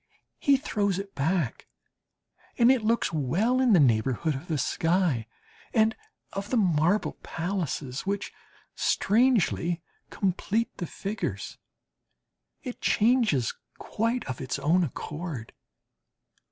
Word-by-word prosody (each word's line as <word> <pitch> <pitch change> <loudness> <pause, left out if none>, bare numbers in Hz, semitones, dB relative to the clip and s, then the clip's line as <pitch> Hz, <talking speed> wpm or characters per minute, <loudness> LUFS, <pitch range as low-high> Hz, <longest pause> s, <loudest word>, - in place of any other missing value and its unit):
He 280 -1 +4
throws 205 -8 -1
it 195 0 -6
back, 155 -1 -1 0.9
and 235 +2 +6
it 260 -3 +2
looks 225 -5 +1
well 180 - +1
in 250 -4 +4
the 180 - +6
neighbourhood 130 +4 +2
of 140 +6 -7
the 160 -4 -1
sky 165 - +1 0.5
and 220 -1 +4 0.4
of 200 +1 -4
the 255 - +1
marble 180 0 +2
palaces, 160 -6 -3
which 200 +1 -3 0.4
strangely 200 -7 +2 0.3
complete 200 +4 -1
the 175 - -4
figures; 200 +6 -4 1.0
it 250 -4 -7
changes 215 - +2 0.2
quite 230 +3 -1
of 130 -2 -5
its 130 +1 -2
own 160 +6 +3
accord. 150 -4 -5
185 Hz, 115 wpm, -27 LUFS, 150-220 Hz, 1.0 s, and